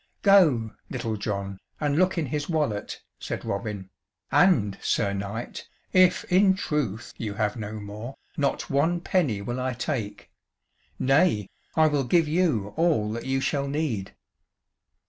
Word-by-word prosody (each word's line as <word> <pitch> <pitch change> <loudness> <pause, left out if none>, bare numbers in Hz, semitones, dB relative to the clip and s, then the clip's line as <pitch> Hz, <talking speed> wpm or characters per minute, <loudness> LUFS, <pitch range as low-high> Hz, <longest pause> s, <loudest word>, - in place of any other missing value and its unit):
"Go, 155 - +5 0.2
Little 115 -3 -3
John, 100 -1 -4 0.2
and 145 -2 0
look 185 +3 +2
in 165 - +1
his 145 +3 -3
wallet," 150 -11 -2 0.2
said - - -5
Robin, 100 -2 -4 0.4
"and, 110 - +4
Sir 100 -3 +1
Knight, 100 +4 -5 0.3
if 185 -1 +5
in 190 +1 +4
truth 135 - -2
you 105 -3 -4
have 105 +1 0
no 110 -2 -5
more, 105 +4 -7 0.2
not 140 -1 -1
one 160 +6 +1
penny 150 - 0
will 120 +4 -3
I 130 0 -1
take; 120 -4 -4 0.7
nay, 135 - +2 0.2
I 160 - +5
will 145 -3 +2
give 165 +5 +3
you 150 - +1
all 155 -11 +2
that 115 +3 -5
you 135 0 +1
shall 140 0 0
need." 140 -9 -2
130 Hz, 145 wpm, -26 LUFS, 105-155 Hz, 0.7 s, Go